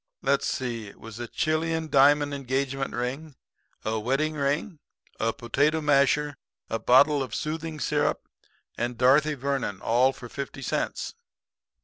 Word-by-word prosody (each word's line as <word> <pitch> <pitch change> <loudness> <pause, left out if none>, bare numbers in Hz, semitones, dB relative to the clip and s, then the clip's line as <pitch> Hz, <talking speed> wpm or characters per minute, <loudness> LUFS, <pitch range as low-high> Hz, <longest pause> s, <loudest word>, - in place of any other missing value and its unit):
Let's 140 0 +2
see, 120 -5 -3
it 100 - -14
was 115 0 -10
a 120 - -4
Chilian 160 +3 -1
diamond 145 0 +4
engagement 135 0 -2
ring, 135 +5 -4 0.5
a 110 0 0
wedding 135 +7 0
ring, 150 +4 -1 0.4
a 115 +1 +1
potato 145 +6 +1
masher, 145 0 +2 0.3
a 115 - 0
bottle 140 +6 +5
of 130 -4 -4
soothing 155 0 -4
syrup 150 -1 0 0.5
and 120 0 -2
Dorothy 145 +5 +4
Vernon 135 -7 -2
all 125 +3 +3
for 130 -2 -10
fifty 135 +2 -6
cents.' - - -2
140 Hz, 135 wpm, -26 LUFS, 125-150 Hz, 0.5 s, bottle